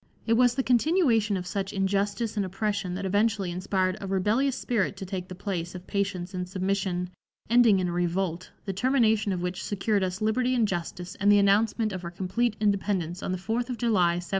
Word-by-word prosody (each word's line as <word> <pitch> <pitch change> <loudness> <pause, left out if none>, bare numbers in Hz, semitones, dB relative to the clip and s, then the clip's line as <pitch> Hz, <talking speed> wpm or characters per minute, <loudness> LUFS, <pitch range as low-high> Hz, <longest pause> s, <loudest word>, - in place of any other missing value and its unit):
It 230 - +2
was 245 +1 +4
the 265 - 0
continuation 245 - +3
of 180 - -5
such 195 +2 -3
injustice 200 +3 -1
and 205 - +1
oppression 195 -1 -2
that 195 +1 -4
eventually 205 -1 +1
inspired 185 +1 -1
a 195 - -5
rebellious 215 +8 +1
spirit 210 -4 -1
to 195 - -6
take 185 -1 -5
the 185 - -8
place 175 -2 -4
of 180 0 -8
patience 195 -2 -2
and 180 -1 -4
submission, 185 -1 -1 0.4
ending 235 -4 +6
in 180 - 0
a - - -3
revolt, 175 0 -1 0.2
the 195 - -3
termination 220 -2 +2
of 180 -2 -2
which 180 0 -3
secured 205 +1 0
us 185 0 -2
liberty 245 +4 +1
and 230 -3 +3
justice 175 0 -4
and 205 +1 +4
the 205 - +6
announcement 210 +2 +3
of 185 -1 -5
our 170 - -4
complete 195 +6 -1
independence 195 -4 0
on - - -3
the 185 - -1
4th 230 +6 -2
of 250 - -3
July, 190 -8 +2
1776. 175 0 -6
195 Hz, 205 wpm, -27 LUFS, 185-220 Hz, 0.4 s, ending